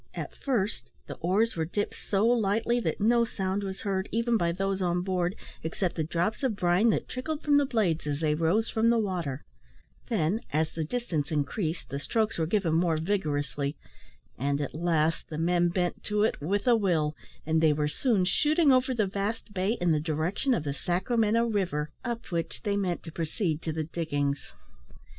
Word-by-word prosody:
At - - -5
first, 230 -7 -1 0.2
the - - -6
oars 200 +7 +1
were 165 - 0
dipped 205 +6 -2
so 200 +1 0
lightly 230 0 +2
that - - -2
no 235 +3 +4
sound 195 -3 -2
was 195 -1 -5
heard, 195 -2 -1
even 230 +1 +1
by 170 -6 +2
those 195 +2 -1
on 175 -1 +1
board, 180 0 0 0.3
except 170 +3 -2
the 160 - 0
drops 170 +7 -1
of 260 -6 +1
brine 185 +3 +3
that - - 0
trickled 300 +5 -4
from 290 -1 +4
the 285 -1 +3
blades 185 - 0
as 145 -1 -1
they 155 -2 +2
rose 165 +9 +2
from 225 +1 +2
the 235 - +4
water; 175 - -2 0.6
then, 210 -1 +1
as 155 +2 +1
the 165 - -3
distance 165 -6 -2
increased, 155 +3 -2
the 140 - -2
strokes 220 +6 0
were 160 - +1
given 190 -3 +1
more 165 -1 +2
vigorously, 150 -5 -1 0.6
and, 140 +2 0
at 145 - -3
last, 165 -1 0
the 155 - -5
men 175 +1 +2
bent 175 0 -1
to 210 0 +1
it 220 - 0
"with 200 - 0
a 245 -2 +6
will;" 165 -8 +1 0.3
and 160 +1 +2
they 160 -1 +5
were 150 0 +1
soon 200 - +1
shooting 300 - +3
over 255 0 +3
the 215 -3 +2
vast 205 +3 -3
bay 190 +3 +1
in 175 -1 +2
the 155 - +3
direction 160 - 0
of 160 - -2
the 140 -2 -2
Sacramento 215 - +1
river, 175 -9 -1
up 235 -1 -3
which 170 -1 -3
they 205 -2 0
meant 185 -4 -1
to 165 - -8
proceed 165 0 -2
to 160 - -2
the 155 0 -2
"diggings." 145 -3 -2
185 Hz, 195 wpm, -28 LUFS, 160-220 Hz, 0.6 s, a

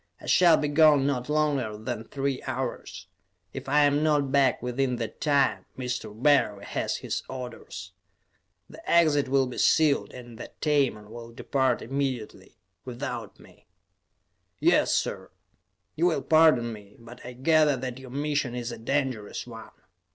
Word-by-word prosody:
I - - -13
shall 170 -3 +5
be 150 - -1
gone 145 -2 +5
not 130 -2 -2
longer 145 -8 0
than 115 0 -5
three 135 +1 -3
hours; - - -5 0.5
if - - -7
I 150 +2 +4
am 145 +1 +3
not 145 -3 +1
back 135 -3 +3
within 125 +1 -1
that 115 -3 -6
time, 135 -10 +1
Mr. 125 -3 -4
Barry 110 -4 +2
has - - -2
his - - -4
orders. 120 -8 -8 0.8
The - - -13
exit 155 -5 +4
will 135 0 +2
be 125 - -6
sealed, 155 -3 +3
and 120 -2 -11
the - - -8
Tamon 135 -9 0
will 115 0 -9
depart 130 +1 -1
immediately, 130 -3 -4 0.3
without 120 -3 -6
me." - - -20 0.9
"Yes, - - +3
sir. - - -2 0.7
You 170 +3 +2
will 170 - 0
pardon 155 -8 +4
me, 105 -1 -13
but 120 +1 -13
I 125 - -8
gather 150 +2 +3
that 125 0 -5
your 130 -1 -11
mission 145 -2 -2
is 120 0 -4
a - - -8
dangerous 130 -4 -2
one. 115 -2 -10
130 Hz, 150 wpm, -26 LUFS, 120-145 Hz, 0.9 s, shall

